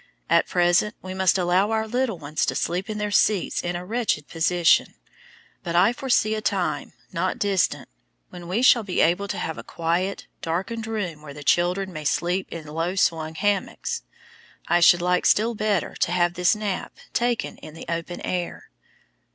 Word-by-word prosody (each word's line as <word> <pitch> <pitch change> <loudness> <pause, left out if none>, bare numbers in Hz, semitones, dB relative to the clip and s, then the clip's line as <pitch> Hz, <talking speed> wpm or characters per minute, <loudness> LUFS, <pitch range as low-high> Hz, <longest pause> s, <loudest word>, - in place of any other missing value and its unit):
At - - +4
present 175 +4 +2
we 185 0 -6
must 190 0 +3
allow 185 +3 +2
our 220 0 0
little 245 -3 -1
ones 150 -1 -3
to - - -1
sleep 180 +5 -2
in 215 - -3
their 210 -1 -2
seats 200 -2 +2
in 175 0 -3
a 175 +1 -5
wretched 220 -8 -1
position, 170 +1 +2 0.7
but 170 0 -4
I 180 +7 +5
foresee 245 -5 +1
a 215 - -2
time, 175 -8 -1 0.2
not 185 +3 -1
distant, 195 -3 0 0.4
when 175 -1 -9
we 205 +8 0
shall 245 -2 +6
be 195 -4 -3
able 180 +5 +2
to - - -4
have 160 - -4
a - - -7
quiet, 170 +4 -2 0.2
darkened 195 +7 -3
room 190 -9 -3
where 145 -2 -10
the 145 - -9
children 180 +4 +1
may 155 -1 -6
sleep 180 +5 0
in 165 -2 -7
low 165 +4 -2
swung 160 -4 +1
hammocks. 205 +4 -1 0.7
I 175 - +3
should 175 +1 +6
like 180 0 +2
still 225 +3 +3
better 210 -5 -1
to - - 0
have 175 -1 +2
this 180 +3 +3
nap 210 -3 -4 0.2
taken 240 -1 0
in 155 - -11
the - - -9
open 170 +1 -4
air. 180 -1 -4
180 Hz, 180 wpm, -24 LUFS, 170-210 Hz, 0.7 s, shall